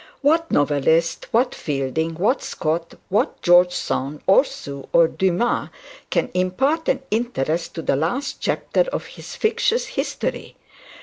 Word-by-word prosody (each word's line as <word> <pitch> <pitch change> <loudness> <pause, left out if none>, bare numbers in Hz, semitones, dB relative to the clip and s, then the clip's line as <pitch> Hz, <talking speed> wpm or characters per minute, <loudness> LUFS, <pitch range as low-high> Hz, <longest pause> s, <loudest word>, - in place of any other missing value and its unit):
What 325 +3 +2
novelist, 150 +3 +1
what 245 +3 +2
Fielding, 150 +3 -2
what 210 - +1
Scott, 165 +2 -3
what 200 +3 0
George 175 0 +6
Sand, 140 -1 -3
or 195 +7 +6
Sue, 140 - -8
or 170 -1 +6
Duncan, 190 +7 0 0.4
can - - 0
impart 265 - 0
an 270 - 0
interest 175 - -1
to 165 - -4
the - - +1
last 180 - -2
chapter - - 0
of - - -3
his - - -10
fictitious 455 +2 +1
history? - - -4
180 Hz, 135 wpm, -22 LUFS, 160-250 Hz, 0.4 s, George